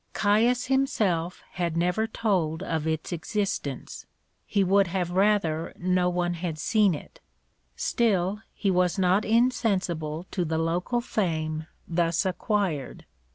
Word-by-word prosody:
Caius 230 +4 +2
himself 210 -11 0
had 170 -2 -2
never 180 +6 +1
told 185 -7 0
of 160 -3 -2
its 160 0 -2
existence; 175 -5 -3 0.4
he 200 -2 +2
would 195 +1 +4
have 175 0 -2
rather 185 -4 +1
no 180 0 +1
one 175 0 0
had 170 -2 -4
seen 200 +2 +3
it; - - -11 0.6
still, 205 -3 +1
he 200 - 0
was 180 +1 +2
not 190 +2 +3
insensible 190 -9 +1
to 180 - 0
the 160 -1 -1
local 175 +9 0
fame 160 -8 -2 0.2
thus 170 +1 +1
acquired. 185 - -1
180 Hz, 125 wpm, -26 LUFS, 165-205 Hz, 0.6 s, would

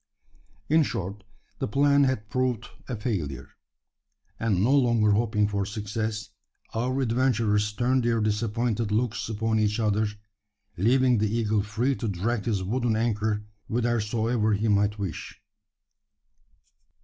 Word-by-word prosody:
In 160 +2 +4
short, 100 - -3 0.4
the - - -1
plan 140 +4 +4
had 130 -6 -1
proved 125 +1 -1 0.2
a 125 - -2
failure; 95 - -3 0.9
and, 100 -5 +1
no 130 +5 +4
longer 120 -6 +3
hoping 105 -1 +2
for 100 -1 -1
success, 105 +1 -3 0.4
our 125 +4 -1
adventurers 115 -4 +1
turned 125 +4 +1
their 115 -1 +2
disappointed 110 +1 0
looks 110 0 -1
upon 110 0 0
each 105 +1 +1
other 105 -1 +1 0.7
leaving 125 +4 +3
the 110 0 +1
eagle 110 -2 +1
free 110 +6 0
to 115 - -3
drag 105 +3 -1
his 105 -5 0
wooden 120 +3 0
anchor 110 -2 0 0.2
whithersoever 115 -1 0
he 105 +2 0
might 105 0 +2
wish. 95 -6 -5
110 Hz, 125 wpm, -26 LUFS, 105-120 Hz, 0.9 s, In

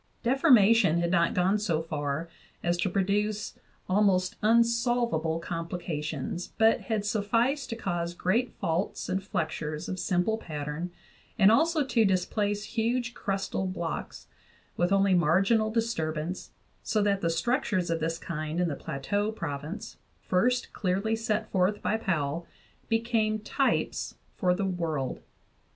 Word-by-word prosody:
Deformation 230 - +5
had 170 0 0
not 170 -2 +2
gone 190 +3 +2
so 170 -7 0
far 150 0 -3 0.4
as 175 0 +2
to 190 - 0
produce 205 +3 -1 0.3
almost 185 -2 +2
unsol 235 +2 +3
vable 160 +1 -1
complications, 170 +2 -4
but 225 0 +4
had 215 -3 -2
sufficed 230 +7 +1
to 230 - -3
cause 175 -5 -3
great 225 +9 +1
faults 175 +2 -1
and 190 +1 0
flexures 155 -4 -3
of 185 - -4
simple 185 +6 +1
pattern, 150 0 -4 0.5
and 205 -1 +6
also 315 +4 +3
to 235 -3 +3
displace 205 +2 0
huge 240 +2 -1
crustal 195 -2 -2
blocks, 170 -3 -5 0.5
with 175 +2 +1
only 195 -1 +4
marginal 195 +6 +3
disturbance, 180 -7 -2 0.3
so 215 -2 +1
that 200 -1 +1
the 170 - +1
structures 185 - 0
of 165 - 0
this 165 +1 -1
kind 155 0 -4
in 180 -1 +2
the 145 - -2
Plateau 205 +12 -2
province, 155 -2 -6 0.2
first 245 +7 +1
clearly 200 +3 0
set 220 -1 -1
forth 190 +2 +2
by 215 - +1
Powell, 165 -6 -1 0.4
became 225 -1 +1
types 240 +5 -1 0.2
for 180 -1 +2
the 200 +1 -1
world. 165 -7 -2
195 Hz, 135 wpm, -28 LUFS, 170-220 Hz, 0.5 s, and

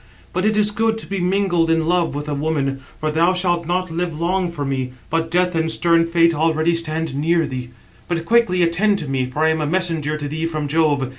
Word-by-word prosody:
But 185 +2 0
it 215 0 +2
is 210 0 +3
good 220 +1 0
to 225 - -5
be 195 -1 -3
mingled 180 -2 +1
in 165 -1 +2
love 170 -3 +1
with 145 +1 -4
a 150 - -2
woman; 140 -2 -1 0.2
for 155 0 -1
thou 170 +4 +3
shalt 175 -2 0
not 180 0 -1
live 165 -2 -3
long 180 +1 0
for 145 -4 -4
me, 130 -2 -2 0.2
but 165 0 0
Death 180 +1 +1
and 160 -1 0
stern 165 0 +3
Fate 165 0 +3
already 160 +1 +1
stand 160 -2 -2
near 165 +4 +1
thee. 125 -2 -5 0.4
But 170 -2 -2
quickly 195 -5 +3
attend 195 +5 +2
to 155 - -5
me, 130 -2 -1
for 150 +5 -1
I - - +4
am 160 0 0
a 150 - -1
messenger 160 -3 -1
to 145 -1 -4
thee 160 +3 -2
from 155 -3 -3
Jove. 145 -3 +1
165 Hz, 230 wpm, -20 LUFS, 150-180 Hz, 0.4 s, I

